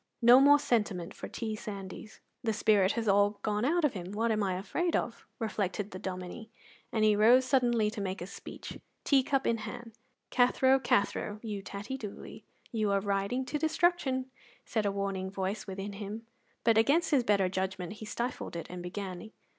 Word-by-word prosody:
No 240 +2 +9
more 285 +1 +7
sentiment 210 -10 -1
for - - -7
T. 220 -2 -4
Sandys. 205 0 -8 0.2
"The 225 -2 +1
spirit 210 -2 +3
has 230 -2 -2
all 205 +1 +4
gone 210 0 0
out 320 +5 +2
of 285 - +1
him; 185 -1 -6
what 225 +2 +1
am 215 -1 +1
I 190 -2 0
afraid 335 - -1
of?" 230 -1 -3
reflected 205 -2 -2
the 185 - -7
Dominie, 185 +4 -6 0.4
and 220 - +1
he 210 -1 +5
rose 240 +5 +6
suddenly 240 -4 +2
to 210 - -5
make 190 -1 -3
a 175 - -5
speech, 195 - -9 0.2
tea 275 -2 +4
cup 270 +1 0
in 230 - +2
hand. 230 +2 -7 0.4
"Cathro, 260 +2 +4
Cathro, 210 -3 0
you 210 -3 -4
tattie 205 +7 -6
doolie, 210 -4 -8 0.3
you 215 -4 0
are 200 0 +3
riding 200 +6 -1
to 295 +3 -2
destruction," 300 -5 +1 0.3
said 220 -3 0
a - - +1
warning 195 -1 -2
voice 195 +2 -3
within 195 +1 -5
him, 210 +3 -6 0.4
but 225 -1 +5
against 295 +10 +3
his 275 -4 +4
better 200 -4 +3
judgment 185 -1 -3
he 215 0 -9
stifled 235 -3 -4
it 170 - -4
and 180 0 -6
began. 185 +2 -6
215 Hz, 185 wpm, -31 LUFS, 195-245 Hz, 0.4 s, No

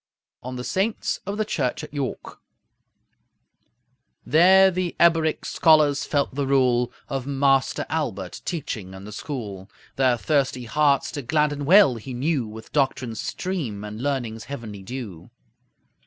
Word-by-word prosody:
ON 125 +1 -6
THE 125 - -5
SAINTS 195 - -1
OF 200 +1 -3
THE 215 - 0
CHURCH 150 -3 -2
AT 150 - -10
YORK 140 -3 -5 1.9
There 190 +7 +6
the 180 -1 -2
Eboric 165 -2 +3
scholars 150 -3 +4
felt 140 -2 0
the 140 0 -2
rule 125 -3 +2 0.2
Of 135 -1 -4
Master 135 -1 +2
Aelbert, 100 - -3
teaching 105 - -5
in 95 - -10
the 105 - -9
school. 105 -6 -6 0.3
Their 130 -2 +3
thirsty 135 -2 0
hearts 140 +3 +2
to 145 - -4
gladden 145 +1 0
well 175 - +6
he 125 +3 -7
knew 135 -2 0
With 110 +1 -11
doctrine's 130 -5 0
stream 140 - -4
and 105 +2 -7
learning's 120 -5 -2
heavenly 110 -7 -7
dew. 100 -5 -8
135 Hz, 140 wpm, -24 LUFS, 120-155 Hz, 1.9 s, There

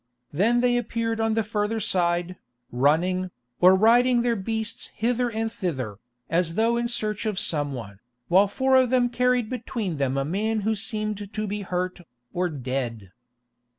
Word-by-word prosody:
Then 230 +10 +3
they 245 -1 +3
appeared 230 -1 -2
on 225 0 +1
the 225 - +1
further 215 +1 -1
side, 175 -2 0 0.4
running, 170 +8 +2 0.3
or 185 +1 +7
riding 240 +4 +4
their 240 -1 +1
beasts 220 +2 -3
hither 245 +2 0
and 225 0 -2
thither, 135 - -4 0.3
as 165 0 0
though 230 +3 +2
in 235 0 0
search 215 -2 -2
of 210 -3 -2
some 145 -5 0
one, 100 -6 -8 0.3
while 190 +4 +5
four 265 +6 +1
of 255 -2 +4
them 250 -1 +3
carried 250 -1 +1
between 225 - -4
them 135 -1 0
a 135 - 0
man 215 +7 -1
who 220 +2 +1
seemed 215 -1 -4
to 215 0 -3
be 205 0 -3
hurt, 180 -1 -3 0.3
or 180 0 0
dead. 125 - -4
210 Hz, 165 wpm, -25 LUFS, 175-230 Hz, 0.4 s, or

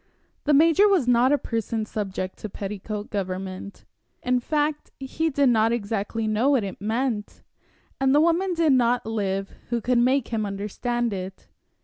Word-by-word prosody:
The 295 - +3
major 330 +7 +5
was 370 -11 +2
not 245 +2 +4
a 290 - +4
person 225 -3 -3
subject 195 -3 -4
to 215 - -6
petticoat 205 +1 -6
government. 190 0 -5 0.4
In 250 0 +2
fact, 300 +3 -1
he 295 +4 -1
did 280 -2 +3
not 225 -1 +3
exactly 220 0 -2
know 215 +5 +2
what 270 -6 +3
it 195 -1 -6
meant, 225 0 -2 0.6
and 270 0 +2
the - - +6
woman 340 +3 +2
did 325 -4 +3
not 245 -1 +2
live 195 -3 -2 0.2
who 240 -1 0
could 245 +2 +1
make 255 +1 +2
him 225 -2 -1
understand 210 +4 -2
it. 190 0 -7
235 Hz, 160 wpm, -24 LUFS, 205-270 Hz, 0.6 s, the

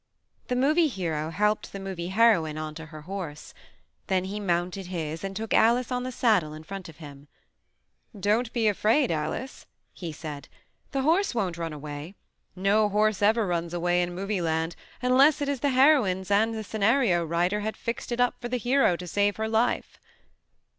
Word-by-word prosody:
The 250 - -1
Movie 305 +6 +3
Hero 165 - -3
helped 210 +5 0
the 195 - -7
Movie 190 -3 -5
Heroine 190 -7 +3
onto 155 +1 -6
her 155 0 -11
horse. 175 -4 -7 0.5
Then 185 -1 +1
he 200 +3 -4
mounted 180 0 -1
his 165 -2 -4
and 195 0 -4
took 220 +2 -3
Alice 235 +2 +3
on 250 0 0
the 255 +1 -4
saddle 200 -11 +1
in 155 - -10
front 195 +1 -8
of 160 - -14
him. 145 -3 -12 0.9
"Don't 220 +4 +1
be 230 -3 +1
afraid, 220 - +2
Alice,'' 160 - -4 0.3
he 170 -3 -6
said. 150 -2 -8 0.4
"The 270 -2 -1
horse 335 +1 +2
won't 190 -7 -1
run 165 -1 -3
away. 150 +4 -7 0.4
No 205 +3 +2
horse 210 0 +1
ever 220 +2 +3
runs 170 -1 -2
away 175 +1 +1
in 175 0 -3
Movie 195 +1 -2
Land 160 0 -1 0.3
unless 270 +4 +5
it 285 - -2
is 280 -2 -1
the 285 - +1
heroine's 255 -9 +3
and 220 +3 +3
the 220 - -4
scenario 215 -3 +2
writer 175 +5 0
had 215 +1 -4
fixed 235 +1 -4
it 240 - -2
up 245 0 +1
for 240 - -4
the 250 - 0
hero 245 -5 +3
to 180 - -7
save 205 +4 +1
her 220 0 -2
life." 225 +2 0
195 Hz, 180 wpm, -27 LUFS, 170-230 Hz, 0.9 s, unless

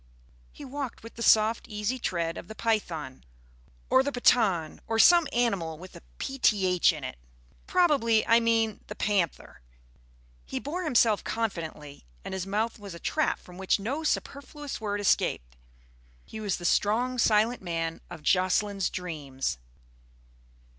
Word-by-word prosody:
He 290 - -11
walked 270 -3 -6
with 230 - -10
the 230 - -10
soft, 220 0 +4
easy 210 +4 -2
tread 170 -6 -2
of - - -8
the 220 - -9
python, 165 - -2 0.6
or 260 - +5
the 285 +2 -2
Pathan, 210 - +2
or 225 - -1
some 340 +6 +6
animal 195 -10 0
with 185 +3 -12
a - - -11 0.2
"pth" 195 -10 +2
in 155 -4 -8
it. 130 - -6 0.5
Probably 280 -12 +3
I 230 +1 +5
mean 225 -2 +1
the 210 - -7
panther. 190 - -1 0.8
He - - -6
bore 345 +6 -4
himself 230 -7 +3
confidently, 160 -10 -4 0.2
and - - -5
his 190 0 -4
mouth 220 +3 -1
was 200 -4 -9
a - - -9
trap 310 - 0
from 180 0 -14
which 190 +2 +1
no 265 +10 -3
superfluous 285 -2 -3
word 205 -1 -2
escaped. 60 - 0 0.7
He 220 - -8
was 205 -3 -1
the 175 - -8
strong, 240 +8 +1
silent 220 +2 +3
man 165 -2 -3
of 170 -3 -10
Jocelyn's 190 +2 +1
dreams. 145 - -4
210 Hz, 145 wpm, -28 LUFS, 175-235 Hz, 0.8 s, some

